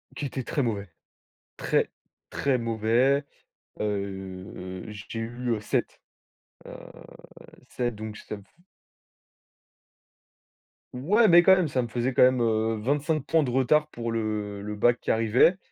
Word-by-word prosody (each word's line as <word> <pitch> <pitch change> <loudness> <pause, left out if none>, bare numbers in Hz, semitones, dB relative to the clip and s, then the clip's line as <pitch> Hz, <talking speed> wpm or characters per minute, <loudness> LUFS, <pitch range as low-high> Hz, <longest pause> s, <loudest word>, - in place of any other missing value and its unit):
qui 145 - -4
était 130 -1 -4
très 145 +4 -1
mauvais, 105 -6 -2 0.7
très, - - +1 0.4
très 140 -2 +1
mauvais, 115 +4 +2 0.6
heu, 95 -2 -5
j'ai 105 +2 -7
eu, 120 +2 -4
heu, - - -4
7, 105 - -2 0.6
heu - - -9 0.9
7, 120 -2 -2
donc 110 0 -7
ça 105 - -7
me 100 - -13
f 95 - -26 2.5
Ouais, 195 - +3
mais 175 -1 +7
quand 190 +2 +7
même, 180 -3 +1
ça 130 -3 0
me 120 - -3
faisait 120 +3 -1
quand - - +5
même, 130 0 +4
heu, 110 -1 +1
25 145 +5 0
points 160 -1 +3
de 130 - -2
retard 135 +4 +3
pour 115 -4 -4
le 105 -2 -3
le 105 +1 -5
bac 120 +3 +3
qui - - 0
arrivait. 115 +10 +4
115 Hz, 145 wpm, -26 LUFS, 105-135 Hz, 2.5 s, mais